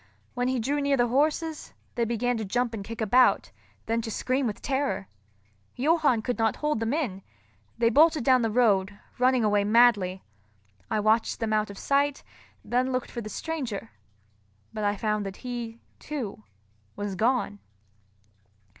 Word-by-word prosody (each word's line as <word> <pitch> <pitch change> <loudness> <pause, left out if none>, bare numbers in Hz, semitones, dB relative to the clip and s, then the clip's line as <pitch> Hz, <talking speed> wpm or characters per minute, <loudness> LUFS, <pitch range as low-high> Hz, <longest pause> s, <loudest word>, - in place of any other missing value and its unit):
When 245 0 -1
he 260 0 0
drew 280 +5 0
near 280 -1 +2
the 240 -1 +2
horses, 310 +4 0 0.2
they 235 - 0
began 240 +2 0
to 220 - -3
jump 240 +4 -1
and 210 -3 -5
kick 230 +3 -7
about, 245 +4 +3 0.3
then 230 +1 0
to 225 - -5
scream 255 +4 0
with 210 - -4
terror. 270 -7 -1 0.7
Johann 285 -4 +2
could 245 -1 -2
not 225 -1 +2
hold 300 -5 -1
them 225 0 -1
in; 255 -11 -2 0.6
they 230 0 +3
bolted 310 +1 +5
down 255 0 +4
the 225 - +1
road, 205 -4 +2 0.2
running 255 -1 +3
away 205 -1 +3
madly. 205 -4 +3 0.7
I - - 0
watched 220 +2 +2
them 220 -1 -1
out 215 -1 +1
of 200 - -9
sight, 280 +3 +1 0.4
then 255 +2 0
looked 255 -1 -2
for 235 - -5
the 215 - -7
stranger; 240 - -4 0.8
but 215 -1 -4
I 205 0 +1
found 210 0 -1
that 195 -1 -6
he, 235 -2 -5 0.2
too, 235 - -6 0.5
was 205 -1 -4
gone. 220 0 0
235 Hz, 165 wpm, -27 LUFS, 215-260 Hz, 0.8 s, bolted